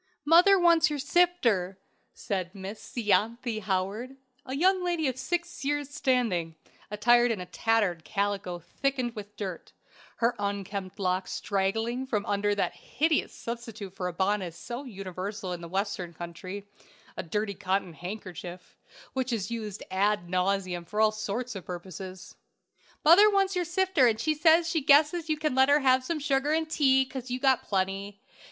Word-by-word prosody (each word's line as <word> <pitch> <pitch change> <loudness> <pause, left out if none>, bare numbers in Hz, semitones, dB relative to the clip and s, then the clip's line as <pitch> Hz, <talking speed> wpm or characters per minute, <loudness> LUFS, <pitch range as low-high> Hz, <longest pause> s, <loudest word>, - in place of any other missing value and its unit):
"'Mother 350 +6 +7
wants 340 -3 +5
your 295 - -2
sifter,' 270 - +2 0.3
said 185 -1 -4
Miss 195 +2 -8
Ianthe 225 +2 +1
Howard, 200 +7 -2 0.3
a 260 - -3
young 370 +4 +3
lady 345 -4 0
of 260 - -1
six 345 +5 -3
years' 290 0 -1
standing, 235 - 0 0.3
attired 240 +4 +4
in 225 -4 -1
a 180 - -5
tattered 180 -2 0
calico 200 -1 -2
thickened 255 +7 -2
with 205 -1 -9
dirt; 190 -5 -6 0.4
her 235 +1 +1
unkempt 200 -1 -4
locks 185 -1 -1
straggling 225 +6 -1
from 210 -5 -1
under 205 0 +1
that 200 - 0
hideous 315 +1 0
substitute 230 -5 -7
for 185 -2 -3
a - - -2
bonnet 190 -2 -1
so 240 +9 -7
universal 195 -2 -5
in 175 - -6
the 170 - -8
Western 190 -2 -3
country 185 +4 -7 0.5
a - - -3
dirty 210 +4 -2
cotton 185 -1 -1
handkerchief 180 -1 -8 0.4
which 260 -1 -1
is 225 -1 -2
used 215 -3 -5
ad 195 -1 +1
nauseam 185 -1 0
for 210 +5 -5
all 220 0 +5
sorts 215 +4 -4
of 195 -3 -7
purposes. 185 +1 -8 0.7
"'Mother 375 +7 +8
wants 390 -2 +2
your 355 -1 0
sifter, 350 -5 +3
and 220 -2 +1
she 310 +6 +1
says 325 +2 +4
she 330 -2 0
guesses 300 +4 +4
you 310 - +1
can 305 -2 -1
let 265 +1 +4
her 290 +1 +5
have 260 -1 +4
some 325 +5 -2
sugar 280 0 0
and 320 0 0
tea, 265 -4 +4
'cause 260 -1 -7
you've 250 +2 -4
got 265 -2 +4
plenty.' 195 +1 -2
220 Hz, 160 wpm, -28 LUFS, 190-275 Hz, 0.7 s, Mother